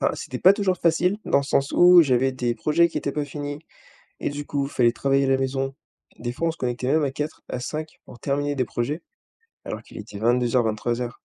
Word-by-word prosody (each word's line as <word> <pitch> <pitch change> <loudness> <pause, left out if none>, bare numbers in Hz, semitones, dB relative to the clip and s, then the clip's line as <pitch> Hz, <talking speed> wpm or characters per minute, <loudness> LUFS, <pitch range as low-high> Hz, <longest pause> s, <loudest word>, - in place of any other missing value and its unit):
enfin, - - +2
c'était 125 - -6
pas 185 - +7
toujours 200 -3 0
facile, 170 +4 +2
dans - - +3
le - - 0
sens 140 0 0
où 175 0 +8
j'avais 130 -2 +2
des 120 -2 -1
projets 170 +5 +3
qui - - -3
étaient 140 - -3
pas 150 0 -2
finis, 145 +1 -6 0.6
et - - -1
du 145 0 -6
coup, 140 -1 -1
fallait 120 -4 +2
travailler 135 +3 +1
à 135 - 0
la 135 - +4
maison. 135 0 -2 0.4
Des 120 +1 -3
fois, 165 +7 -2
on - - +1
se 165 - -13
connectait 125 0 -2
même 155 +2 +3
à 140 - 0
4, 150 +3 -5
à 125 - -3
5 155 +5 -6
pour 120 - -13
terminer 145 +1 -1
des 130 -3 0
projets, 140 +9 -3 0.6
alors - - -5
qu'il - - -12
était 100 - -9
22:00-23:00. 120 0 0
140 Hz, 220 wpm, -24 LUFS, 125-155 Hz, 0.6 s, où